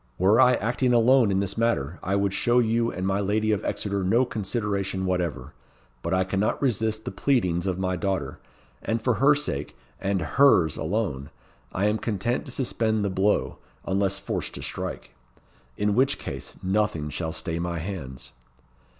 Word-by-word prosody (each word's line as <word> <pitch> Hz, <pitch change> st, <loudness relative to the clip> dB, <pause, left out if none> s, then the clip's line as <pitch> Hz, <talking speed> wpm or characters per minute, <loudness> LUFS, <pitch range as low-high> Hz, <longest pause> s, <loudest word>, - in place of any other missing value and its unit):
Were 100 Hz, +7 st, +5 dB
I 125 Hz, 0 st, +6 dB
acting 125 Hz, +3 st, 0 dB
alone 120 Hz, 0 st, +5 dB
in 95 Hz, 0 st, +1 dB
this 100 Hz, +2 st, -3 dB
matter, 90 Hz, -9 st, 0 dB
I 95 Hz, +2 st, -1 dB
would 100 Hz, -1 st, +1 dB
show 120 Hz, +4 st, +2 dB
you 115 Hz, 0 st, +2 dB
and 90 Hz, +1 st, -4 dB
my 95 Hz, +1 st, +1 dB
lady 105 Hz, +2 st, +1 dB
of 105 Hz, 0 st, 0 dB
Exeter 100 Hz, -1 st, -2 dB
no 115 Hz, +8 st, +3 dB
consideration 100 Hz, -3 st, -2 dB
whatever; 85 Hz, -7 st, -2 dB, 0.5 s
but -, -, -3 dB
I 95 Hz, 0 st, +3 dB
cannot 100 Hz, +3 st, 0 dB
resist 110 Hz, -4 st, 0 dB
the 125 Hz, -, -3 dB
pleadings 95 Hz, -10 st, +1 dB
of 90 Hz, -2 st, -1 dB
my 95 Hz, -1 st, -1 dB
daughter; 95 Hz, 0 st, -2 dB, 0.4 s
and 115 Hz, +1 st, -1 dB
for 125 Hz, +2 st, +1 dB
her 145 Hz, +2 st, +6 dB
sake 75 Hz, -, -4 dB, 0.2 s
and 100 Hz, 0 st, 0 dB
hers 85 Hz, -, +4 dB
alone 80 Hz, -6 st, -2 dB, 0.4 s
I 95 Hz, -, 0 dB
am 105 Hz, +1 st, +1 dB
content 115 Hz, +2 st, -1 dB
to 135 Hz, -, -8 dB
suspend 110 Hz, -4 st, 0 dB
the 100 Hz, -, -1 dB
blow, 95 Hz, +2 st, +1 dB, 0.3 s
unless 95 Hz, 0 st, 0 dB
forced 100 Hz, -, -4 dB
to -, -, -7 dB
strike; -, -, -5 dB, 0.6 s
in 105 Hz, 0 st, +1 dB
which 135 Hz, +5 st, +3 dB
case, -, -, -7 dB
nothing 95 Hz, -6 st, 0 dB
shall 80 Hz, 0 st, -3 dB
stay 80 Hz, 0 st, -4 dB
my 85 Hz, 0 st, -2 dB
hands." 80 Hz, -7 st, -6 dB
100 Hz, 170 wpm, -25 LUFS, 95-115 Hz, 0.6 s, I